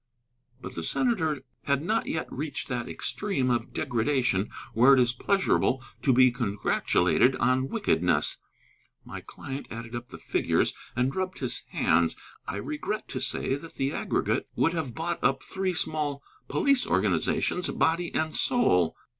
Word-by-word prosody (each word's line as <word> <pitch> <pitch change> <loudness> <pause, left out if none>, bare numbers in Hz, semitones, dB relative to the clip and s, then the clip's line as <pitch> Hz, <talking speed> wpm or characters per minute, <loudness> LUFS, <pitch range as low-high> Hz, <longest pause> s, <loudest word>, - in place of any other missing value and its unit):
But - - -8
the 85 - -4
senator 160 - 0 0.2
had 140 0 +1
not 220 +6 0
yet 160 - -2
reached 145 +1 -4
that 125 -1 -3
extreme 140 -12 -1
of 120 - -1
degradation 120 -4 0 0.2
where 130 +5 +7
it - - +3
is 120 -1 +3
pleasurable 160 -8 +1 0.2
to 135 - +3
be 130 0 +6
congratulated 120 0 +2
on 130 +2 +2
wickedness. 90 - +1 0.7
My - - -7
client 135 +1 -7
added 115 +1 -7
up 120 +1 -6
the - - -10
figures - - +1 0.2
and 125 +2 0
rubbed 185 0 -2
his 130 - -1
hands. 85 0 +2 0.3
I - - -3
regret 150 - -4
to 130 - -3
say 135 0 0
that 150 +4 -6
the 135 +1 -1
aggregate - - -1
would 165 - +2
have 150 -9 -3
bought 170 +3 -3
up 135 0 +2
three 190 -1 -2
small 150 -3 -1 0.2
police 280 -8 +2
organizations, 180 - +1
body 165 +1 +1
and 155 0 -1
soul. 90 - +3
135 Hz, 150 wpm, -27 LUFS, 120-165 Hz, 0.7 s, where